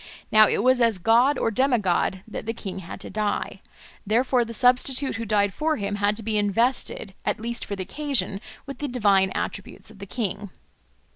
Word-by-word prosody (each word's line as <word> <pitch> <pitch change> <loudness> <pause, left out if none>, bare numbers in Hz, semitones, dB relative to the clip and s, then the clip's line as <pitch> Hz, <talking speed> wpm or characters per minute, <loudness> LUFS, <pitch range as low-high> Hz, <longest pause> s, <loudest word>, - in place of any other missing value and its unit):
Now 215 0 +7
it - - 0
was 255 0 +4
as 230 -4 +3
a - - -17
god 240 +9 +4
or 225 - 0
demigod 210 -7 +1
that 220 - -7
the 225 - -2
king 195 -4 -6
had 170 - -9
to - - -6
die; 210 -1 -2 0.4
therefore 245 +4 +2
the 230 - -8
substitute 255 +2 +2
who 230 - -4
died 205 -2 +1
for 310 +7 0
him 205 0 -3
had 205 +1 +1
to 225 - -6
be 215 0 0
invested, 215 0 0
at - - -1
least 235 +2 -4
for 200 - -4
the 190 - -4
occasion, 275 -6 -2 0.2
with 275 -2 -8
the 290 - -2
divine 200 -6 +3
attributes 200 +2 -5
of 210 - -16
the 200 - -8
king. 205 -2 -4
220 Hz, 200 wpm, -24 LUFS, 200-250 Hz, 0.4 s, Now